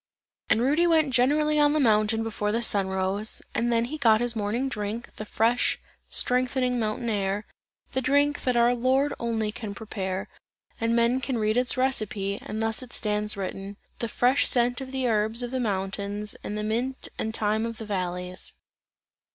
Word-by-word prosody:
And 225 - +3
Rudy 300 +7 +3
went 315 -5 +3
generally 300 +5 +3
on 295 0 +5
the 310 - +2
mountain 220 -3 +3
before 210 -2 -2
the 230 +2 0
sun 200 -3 +3
rose, 190 +3 -2
and 240 +1 0
then 230 0 +2
he 305 +5 -6
got 225 -5 +5
his 240 -1 -1
morning 220 +5 -1
drink, 220 -2 -4
the 215 - -6
fresh, 230 +3 +2 0.3
strengthening 250 0 +1
mountain 220 +2 -2
air, 205 -1 -1 0.5
the 260 - 0
drink, 285 +3 +2
that 250 -2 +1
our 235 +1 +5
Lord 260 +4 +2
only 225 -2 -1
can 210 -2 -6
prepare, 190 -3 -4 0.5
and 230 0 +1
men 235 +2 +2
can 260 -1 -2
read 215 0 +1
its 250 +2 +1
recipe, 215 -6 0
and 220 +1 -4
thus 225 +2 -1
it 250 -2 -10
stands 210 -1 0
written: 195 +1 -5 0.2
"the 235 - -1
fresh 250 +4 +3
scent 245 +1 +2
of 260 -1 -7
the 265 -1 0
herbs 220 +1 +1
of 245 - -4
the 260 - -1
mountains 200 -1 -1
and 210 - -4
the 210 - -2
mint 240 +5 -2
and 220 0 -2
thyme 215 +1 0
of 230 -1 -6
the 220 - -7
valleys." 180 -2 -3
230 Hz, 185 wpm, -26 LUFS, 210-255 Hz, 0.5 s, on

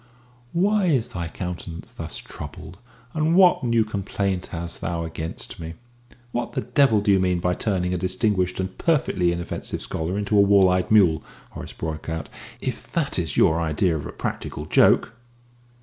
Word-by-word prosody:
"Why 200 +3 +2
is 130 -9 +2
thy 85 -8 -4
countenance 85 -1 -6
thus - - -5
troubled, 90 +4 -9 0.3
and 160 +1 +2
what 180 -5 +6
new 115 -2 +2
complaint 100 -2 -2
hast 85 0 -6
thou 85 0 -2
against 80 0 -6
me?" 80 0 -6 0.6
"What 120 0 -3
the - - -1
devil 125 -4 +3
do 100 - +2
you 95 - +5
mean 90 -1 +2
by 90 +1 +1
turning 90 -2 -1
a 90 - -1
distinguished 95 -1 0
and 95 0 -3
perfectly 130 - +2
inoffensive 85 0 -4
scholar 85 +4 -2
into 105 +1 0
a 100 - +7
wall 100 -2 +6
eyed 90 0 +1
mule?" 95 -7 +5 0.3
Horace - - -8
broke 80 -1 -5
out. 80 -1 -4 0.3
"If - - -5
that - - 0
is - - -2
your 80 +1 +4
idea 80 +2 +1
of 75 - -4
a - - -7
practical - - -5
joke - - +4
95 Hz, 170 wpm, -24 LUFS, 85-110 Hz, 0.6 s, a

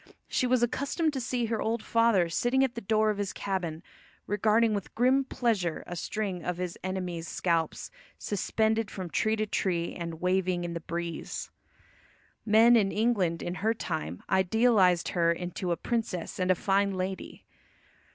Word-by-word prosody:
She 255 - 0
was 250 -1 +3
accustomed 280 +6 0
to 265 - -2
see 245 0 -1
her 225 -1 -2
old 225 0 -1
father 230 -6 +3
sitting 245 +10 +1
at 260 -3 0
the 235 - -6
door 215 +1 +2
of 205 - -5
his 200 -2 -1
cabin 175 -5 -3 0.4
regarding 215 +2 +2
with 200 -3 -4
grim 255 +4 +3
pleasure 215 -11 -1
a 175 - -6
string 190 -1 -3
of 180 -1 -2
his 180 -1 -3
enemy's 180 -3 -3
scalps, 165 -3 -1 0.3
suspended 220 +1 0
from 185 -4 -6
tree 220 0 +1
to 215 0 -1
tree, 175 -4 -1
and 170 -2 -6
waving 180 0 +1
in 170 -1 -4
the 170 - -3
breeze. 170 +1 -5 1.0
Men 225 +3 +7
in 200 -4 +3
England 205 -7 +1
in 175 - -3
her 220 +2 +2
time 155 - -4
idealised 190 -2 +3
her 170 -2 +2
into 175 +1 -3
a 170 - 0
princess 220 -9 -3
and 185 -1 +2
fine 200 +1 +1
lady. 185 +1 -5
195 Hz, 160 wpm, -29 LUFS, 175-225 Hz, 1.0 s, Men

